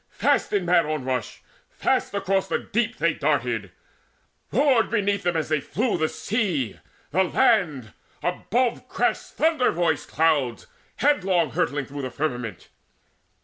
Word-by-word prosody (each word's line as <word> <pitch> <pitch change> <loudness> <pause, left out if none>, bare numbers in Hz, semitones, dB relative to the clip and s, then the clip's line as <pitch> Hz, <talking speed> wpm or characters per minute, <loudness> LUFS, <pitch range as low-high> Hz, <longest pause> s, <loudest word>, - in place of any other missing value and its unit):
Fast - - +1
in 200 -3 +1
mad 175 -2 +3
onrush, 130 -6 -3 0.3
fast - - 0
across 195 -1 0
the - - 0
deep 235 +2 -2
They 170 -1 +2
darted; 120 - -1 0.8
roared 255 -1 +3
beneath 205 -3 +1
them 175 -3 0
as 155 - -2
they 155 -2 +1
flew 220 - -1
The 155 -2 0
sea, 180 - -2 0.3
the 190 +4 +3
land; 175 - +2 0.3
above 235 +7 0
crashed - - -1
thunder 310 -5 +2
voiced 160 -4 0
Clouds 145 -7 +1 0.3
headlong 190 - +2
hurtling 145 -4 -1
through 140 +2 -7
the 130 - -3
firmament. 125 - -4
170 Hz, 135 wpm, -24 LUFS, 145-205 Hz, 0.8 s, mad